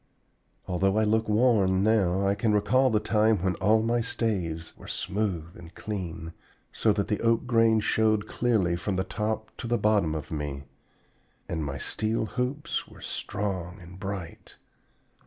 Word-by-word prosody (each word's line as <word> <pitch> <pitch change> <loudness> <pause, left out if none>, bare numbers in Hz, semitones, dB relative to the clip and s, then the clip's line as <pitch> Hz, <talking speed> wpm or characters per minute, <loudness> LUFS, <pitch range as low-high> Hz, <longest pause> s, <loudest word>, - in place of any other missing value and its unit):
Although 95 +2 +1
I 110 - +4
look 110 +1 +1
worn 105 -4 +3
now, 100 -3 +2
I 100 - +3
can 110 +1 +1
recall 120 +6 +3
the 110 -3 +2
time 110 0 +3
when 95 -1 +2
all 110 +3 +3
my 120 +1 +1
staves 90 -9 -2
were - - -13
smooth 90 -5 -3
and 85 0 -13
clean, 85 -6 -5 0.4
so 110 - +2
that 100 -1 -1
the 105 - -1
oak 115 +1 +2
grain 115 -2 +4
showed 110 -1 +2
clearly 105 -8 +1
from 95 +3 -2
the 95 - 0
top 110 +3 -3
to 120 - -5
the 120 +1 +1
bottom 100 -8 +2
of 75 - -6
me, 75 -3 -4 0.8
and 80 -2 -2
my 70 -1 -4
steel 110 - -1
hoops 125 +6 -2
were - - -15
strong 95 -3 -4
and 90 +1 -12
bright. 95 -4 -6
105 Hz, 160 wpm, -27 LUFS, 90-110 Hz, 0.8 s, I